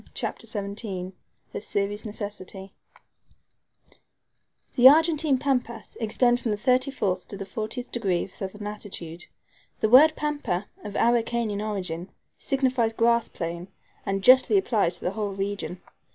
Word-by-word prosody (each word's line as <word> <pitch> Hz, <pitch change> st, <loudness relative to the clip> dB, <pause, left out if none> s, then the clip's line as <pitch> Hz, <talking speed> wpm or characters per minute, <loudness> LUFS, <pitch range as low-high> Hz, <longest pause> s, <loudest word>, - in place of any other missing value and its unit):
CHAPTER 230 Hz, -, -4 dB
XVII 200 Hz, -3 st, -4 dB, 0.4 s
A -, -, -4 dB
SERIOUS 205 Hz, +1 st, -2 dB
NECESSITY 200 Hz, -2 st, -7 dB, 2.0 s
THE 255 Hz, 0 st, +10 dB
Argentine 310 Hz, -2 st, +3 dB
Pampas 250 Hz, -4 st, -2 dB
extend 240 Hz, +2 st, +2 dB
from 240 Hz, -, -3 dB
the 210 Hz, -, 0 dB
thirty 255 Hz, +4 st, +2 dB
fourth 200 Hz, -9 st, -2 dB
to 200 Hz, -, -7 dB
the 195 Hz, -, -6 dB
fortieth 220 Hz, +5 st, -5 dB
degree 190 Hz, -7 st, 0 dB
of 190 Hz, -, -10 dB
southern 200 Hz, +2 st, -6 dB
latitude. 185 Hz, -5 st, -7 dB, 0.5 s
The 220 Hz, -, +1 dB
word 300 Hz, +6 st, +8 dB
PAMPA, 290 Hz, -11 st, -2 dB, 0.2 s
of 205 Hz, -1 st, -7 dB
Araucanian 230 Hz, -3 st, +1 dB
origin, 185 Hz, -5 st, -4 dB, 0.3 s
signifies 255 Hz, -5 st, +1 dB
grass 235 Hz, 0 st, +2 dB
plain, 170 Hz, +1 st, -5 dB, 0.4 s
and 195 Hz, -1 st, -2 dB
justly 260 Hz, -, +6 dB
applies 205 Hz, -, +1 dB
to -, -, -13 dB
the 180 Hz, -, 0 dB
whole 205 Hz, -1 st, -3 dB
region. 195 Hz, -2 st, -4 dB
215 Hz, 135 wpm, -26 LUFS, 195-245 Hz, 2.0 s, THE